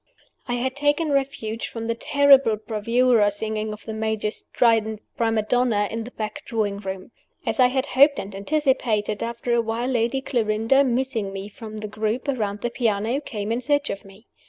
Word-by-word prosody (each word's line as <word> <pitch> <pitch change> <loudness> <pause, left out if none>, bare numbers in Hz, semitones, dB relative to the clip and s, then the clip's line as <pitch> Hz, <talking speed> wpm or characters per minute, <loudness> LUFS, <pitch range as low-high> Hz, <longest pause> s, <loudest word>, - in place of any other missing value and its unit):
I 245 - -1
had 260 +2 -2
taken 290 +2 +1
refuge 265 -5 -1
from 230 -1 -6
the 230 - 0
terrible 275 -2 +5
bravura 225 +1 +2
singing 215 +1 -3
of 210 - -9
the 220 - -5
Major's 220 -1 -1
strident 220 -3 +1 0.2
prima 225 -2 +1
donna 220 -2 +2
in 225 0 -4
the - - -7
back 225 +4 -5
drawing 210 -4 -2
room. 190 +1 -6 0.3
As - - -2
I 250 - +7
had 260 +1 0
hoped 280 +1 +5
and 195 +1 -5
anticipated, 220 -3 0
after 235 +1 -2
a 235 - +3
while 230 +2 -2
Lady 240 +1 +1
Clarinda 230 0 +2
(missing 245 -5 -1
me 195 +1 -6
from 215 0 -9
the 215 0 -5
group 215 +5 -2
around 210 -7 -2
the 240 - -2
piano) 230 +2 0
came 215 -6 -4
in 235 +2 0
search 285 +2 +1
of 195 - -6
me. 195 +3 -16
230 Hz, 180 wpm, -23 LUFS, 215-260 Hz, 0.3 s, I